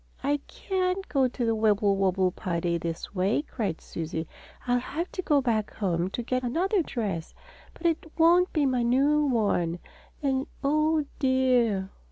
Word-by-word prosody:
"I 290 +1 +2
can't 375 0 -2
go 270 -3 +3
to 245 -1 -3
the 225 - +2
Wibblewobble 200 -4 +2
party 170 -1 -2
this 165 +2 -5
way," 195 +8 +1
cried 210 - -3
Susie. 165 0 -5 0.4
"I'll 245 0 +2
have 325 +8 -4
to 370 - -3
go 295 -5 +3
back 225 -5 -1
home 180 -3 0
to 240 - -4
get 255 +2 -1
another 355 - +1
dress, 205 - -4 0.4
and 340 - -12
it 320 -1 0
won't 350 +2 +5
be 300 -3 +1
my 255 -2 +1
new 275 +5 +3
one 200 -9 +1 0.5
and 270 0 0 0.2
oh, 305 +2 +2
dear!" 250 -7 +2
245 Hz, 155 wpm, -27 LUFS, 195-300 Hz, 0.5 s, won't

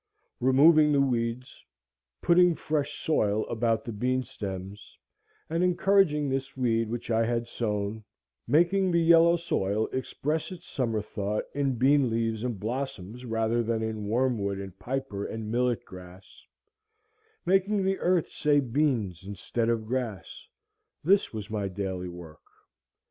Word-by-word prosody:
Removing 150 +4 +5
the 140 - +3
weeds, 125 -2 -1 0.6
putting 175 0 +5
fresh 150 -2 -3
soil 110 -8 +1
about 115 -1 0
the 120 - -4
bean 125 +4 0
stems, 100 -2 -8 0.5
and 165 +2 0
encouraging 180 -4 +3
this 135 0 -3
weed 115 -3 +1
which 120 +1 -4
I 115 0 +3
had 115 0 -1
sown, 105 -2 -3 0.4
making 175 +8 +3
the 170 -1 +3
yellow 170 0 +6
soil 110 - -1
express 150 +6 -2
its 180 - -9
summer 115 -5 -1
thought 105 0 -3
in 140 -2 0
bean 135 +2 +3
leaves 115 -1 -1
and 120 -5 -3
blossoms 120 -1 -5
rather 115 0 0
than 115 -1 -1
in 110 -2 -4
wormwood 110 -4 0
and 95 -2 -7
piper 130 -6 -3
and 110 -1 -5
millet 120 0 0
grass, 90 0 -13 1.0
making 195 +2 +2
the 190 0 0
earth 180 -2 +1
say 145 -1 +2
beans 120 - 0
instead 100 +4 -3
of 115 -2 0
grass,—this 130 - -3
was 110 -1 -7
my 105 -2 -1
daily 95 -1 -4
work. 85 -3 -11
120 Hz, 135 wpm, -28 LUFS, 105-145 Hz, 1.0 s, yellow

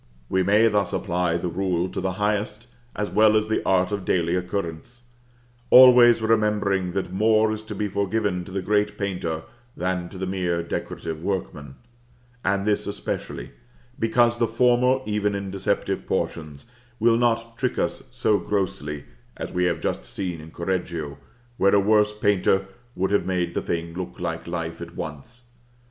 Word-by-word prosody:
We 95 - +2
may 105 +4 +4
thus 105 -4 +1
apply 90 -1 0
the 85 - -3
rule 90 0 0
to - - -4
the 95 0 -1
highest, 105 +3 -1 0.3
as 105 0 -2
well 110 0 +5
as 110 0 0
the 110 - +1
art 95 0 +2
of 100 -2 -2
daily 85 -2 +1
occurrence, 90 +5 -4 0.7
always 125 -2 +8
remembering 105 -4 +1
that 95 -1 -3
more 110 +2 +3
is 110 0 -4
to 110 -1 -6
be 105 - -1
forgiven 100 -1 -1
to 95 - -10
the 95 0 -3
great 105 +1 +1
painter 90 -5 -3 0.3
than 90 -1 -2
to 95 - -10
the 95 - -3
mere 90 -3 -1
decorative 80 -1 -5
workman; 85 -7 -4 0.7
and 100 +1 0
this 105 0 0
especially, 100 -10 -5 0.5
because 120 +1 +3
the 115 - +3
former, 125 +2 +3
even 105 -1 0
in 100 -1 -4
deceptive 95 0 -2
portions, 75 -3 -3 0.3
will 115 +1 +4
not 115 -1 0
trick 130 -2 -1
us - - -1
so 105 -2 +1
grossly; 75 -8 -2 0.3
as - - -5
we 90 0 +1
have 85 -1 0
just - - -2
seen 90 -4 -5
in 80 - -11
Correggio, 85 -4 -3 0.4
where 100 +1 +4
a - - +6
worse 105 +1 +3
painter 100 -2 +2 0.3
would 95 +2 0
have 100 - +1
made 90 -2 -1
the - - -1
thing 85 0 -3
look 90 0 -6
like - - -4
life 85 -1 -4
at 85 0 -8
once. 80 - -8
95 Hz, 165 wpm, -24 LUFS, 90-105 Hz, 0.7 s, always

